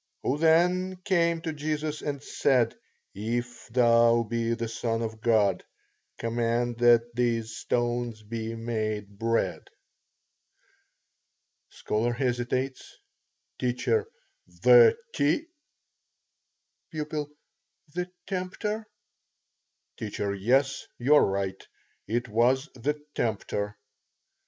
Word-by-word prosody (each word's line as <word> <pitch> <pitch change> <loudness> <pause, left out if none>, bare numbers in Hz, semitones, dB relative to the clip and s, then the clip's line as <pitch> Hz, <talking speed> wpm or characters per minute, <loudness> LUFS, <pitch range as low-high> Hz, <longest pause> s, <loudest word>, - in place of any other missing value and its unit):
Who 140 +3 0
then 180 +3 +3
came 170 -3 +2
to 160 -1 -3
Jesus 155 0 -3
and 140 -2 -4
said, 125 -6 +2 0.4
If 120 +4 -4
thou 115 -1 +4
be 115 +1 -1
the 115 0 -3
Son 115 0 -2
of 110 -1 -5
God, 105 -5 +3 0.5
command 115 +1 -1
that 120 0 +5
these 115 -2 0
stones 120 -2 -1
be 110 +1 -4
made 110 -3 -3
bread? 115 0 0 2.0
(Scholar 115 +3 -1
hesitates.) 125 +1 -2 0.6
T. 125 -1 +1 0.8
The 465 -2 +7 0.2
t? 155 - +1 1.5
P. 155 -1 -2 0.9
The 180 0 -3
tempter. 210 +3 -3 1.1
T. 105 - -5 0.3
Yes, 135 +6 +2
you 130 +5 +3
are 150 - +7
right. 95 -1 -1 0.4
It 120 +3 -1
was 125 +6 +2
the 145 +5 -2
tempter. 105 -2 -2
120 Hz, 95 wpm, -27 LUFS, 115-145 Hz, 2.0 s, The